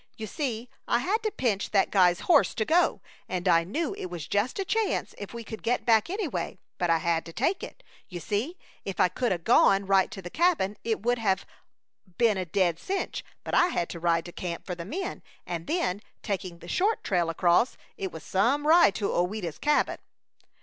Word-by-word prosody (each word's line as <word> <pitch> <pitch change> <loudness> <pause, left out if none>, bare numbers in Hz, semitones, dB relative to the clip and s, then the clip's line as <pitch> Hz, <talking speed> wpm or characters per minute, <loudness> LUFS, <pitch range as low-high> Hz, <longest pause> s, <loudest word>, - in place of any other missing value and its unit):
You 220 - -5
see, 240 0 -3 0.2
I - - +3
had 385 - 0
to 440 - 0
pinch 235 - -1
that 195 -2 +2
guy's 180 -2 +4
horse 320 -5 +4
to 220 - 0
go, 340 +7 +2 0.3
and 180 0 -2
I 165 -2 +5
knew 285 - -2
it - - -5
was 175 -4 -6
just 205 - 0
a 390 - -1
chance 445 +2 0
if 205 - -7
we 235 0 -7
could 220 0 -8
get 240 +2 0
back, 225 +1 +4
anyway; 315 - -3 0.2
but 175 - +1
I 165 - +5
had 165 0 0
to - - -8
take 305 - 0
it. - - -9 0.3
You 180 -2 -6
see, 225 - -2 0.3
if 195 -2 -5
I 180 - +5
could 240 +6 -1
'a' 185 - +1
gone 195 +3 +4
right 195 -1 +3
to 230 - -8
the 175 -2 -8
cabin 320 - +2
it 220 -3 -1
would 245 +1 +1
have 195 -4 +1 0.7
been 230 -3 +4
a 185 - -2
dead 170 -1 +1
cinch, 390 0 -3 0.2
but - - -6
I 350 - +5
had 175 - -1
to 170 - -6
ride 165 -1 +1
to 175 - -8
camp 170 -1 -5
for 180 - -4
the 170 -1 -7
men, 365 - -4 0.2
and 170 -1 -5
then, 265 - 0 0.2
taking 185 -4 -3
the - - -13
short 415 +4 +1
trail 175 -3 +1
across, 175 - +2 0.2
it 190 -2 -4
was 160 - -9
some 245 +10 +1
ride 310 - +6
to 205 - -1
Ouida's 180 -2 -2
Cabin!" 295 0 +1
205 Hz, 210 wpm, -27 LUFS, 175-270 Hz, 0.7 s, ride